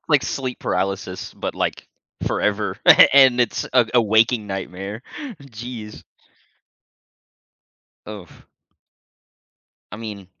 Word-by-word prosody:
Like 150 -4 +4
sleep 130 -2 -4
paralysis, 95 0 -3
but, - - -5
like, - - -3 0.4
forever 105 -1 -1 0.3
and 130 -3 +6
it's 120 - -1
a 120 - +4
a 120 - +6
waking 110 0 +2
nightmare, 95 +3 -6 0.4
jeez. 120 -4 -9 2.0
Oh. 100 -5 -11 1.5
I - - -6
mean, 105 -4 -8
110 Hz, 90 wpm, -21 LUFS, 100-120 Hz, 2.0 s, and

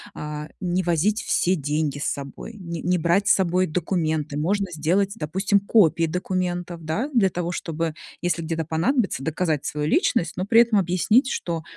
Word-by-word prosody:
а, 150 0 -5
не 180 0 0
возить 175 +5 +1
все 185 +2 +1
деньги 150 -1 -1
с - - -3
собой, 140 - -5
не 170 -4 -6
не 180 +2 +1
брать 175 +5 +2
с - - +7
собой 185 0 +2
документы. 155 -3 -1
Можно 195 +6 0
сделать, 175 +5 +1
допустим, 190 +6 +1
копии 170 -5 +3
документов, 180 0 -3
да, 210 - -1
для 215 -6 +4
того, 175 0 -3
чтобы, 165 -2 -3 0.3
если 175 -1 0
где-то 165 0 -2
понадобится, 190 - 0
доказать 160 -1 -1
свою 150 0 -2
личность, 165 +1 +1
но 185 - -1
при 225 +3 +6
этом 230 -3 +3
объяснить, 195 - +2
что 165 - -3
175 Hz, 170 wpm, -23 LUFS, 160-190 Hz, 0.3 s, с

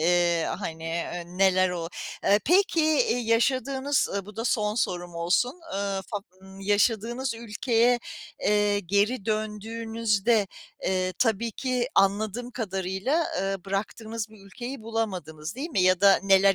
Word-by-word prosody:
Eee, 170 0 +3
hani, 160 -5 -5
eee, 170 +1 -3
neler 185 +1 +3
oluyor. 170 -2 -3 0.4
Eee, 205 +1 +4
peki 355 +1 +4
eee, 315 - +2
yaşadığınız, 265 +4 +1
ııı 200 -1 -3
bu 210 - -12
da 225 - -3
son 210 -3 +1
sorum 175 -6 -2
olsun, 190 - 0
ııı, 195 -1 -1
fa 205 - -1 0.2
ımm, 190 0 -13
yaşadığınız 225 +5 +1
ülkeye, 235 +1 +1 0.4
eee, 205 -1 +2
geri 205 +4 +1
döndüğünüzde, 220 0 0 0.4
eee, 185 -1 0
tabii 230 -1 +1
ki 250 +1 -1
anladığım 210 +5 +1
kadarıyla, 200 - -1 0.2
ııı, 195 -1 -2
bıraktığınız 215 +3 -3
bir 215 -2 -16
ülkeyi 240 +5 -7
bulamadınız, 185 -8 -4
değil 315 +5 -4
mi? 195 - +1
Ya 185 -1 +4
da 195 -1 +7
neler 195 0 +5
210 Hz, 140 wpm, -26 LUFS, 190-235 Hz, 0.4 s, da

